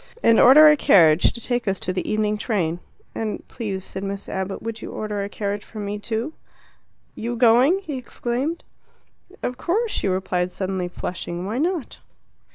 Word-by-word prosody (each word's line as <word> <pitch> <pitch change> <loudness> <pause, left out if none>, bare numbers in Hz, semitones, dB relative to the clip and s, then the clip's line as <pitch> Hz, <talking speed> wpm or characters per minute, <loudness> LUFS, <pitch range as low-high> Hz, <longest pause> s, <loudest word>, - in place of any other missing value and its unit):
"And 230 - +5
order 300 +5 +9
a 300 - +7
carriage 165 - +5
to - - -8
take 240 0 -2
us 195 -1 0
to 185 - -2
the 180 - -3
evening 215 0 +1
train." 185 -7 -1 0.3
"And 220 -1 -4
please," 200 -6 -5
said 190 - -6
Miss 200 0 -5
Abbott, 190 0 -4
"would 225 0 -5
you - - -7
order 210 -2 -3
a 200 - -5
carriage 205 0 -3
for 220 - -13
me 205 0 -4
too?" 230 +7 -3 0.8
"You 235 +2 -4
going?" 245 +8 +5
he 295 -7 -4
exclaimed. 255 +6 -3 0.8
"Of 250 +1 -3
course," 425 - 0
she - - -1
replied, 185 -1 -1
suddenly 190 -1 -3
flushing. 175 0 -5
"Why 220 +6 -2
not?" 335 -3 -2
215 Hz, 170 wpm, -23 LUFS, 190-245 Hz, 0.8 s, order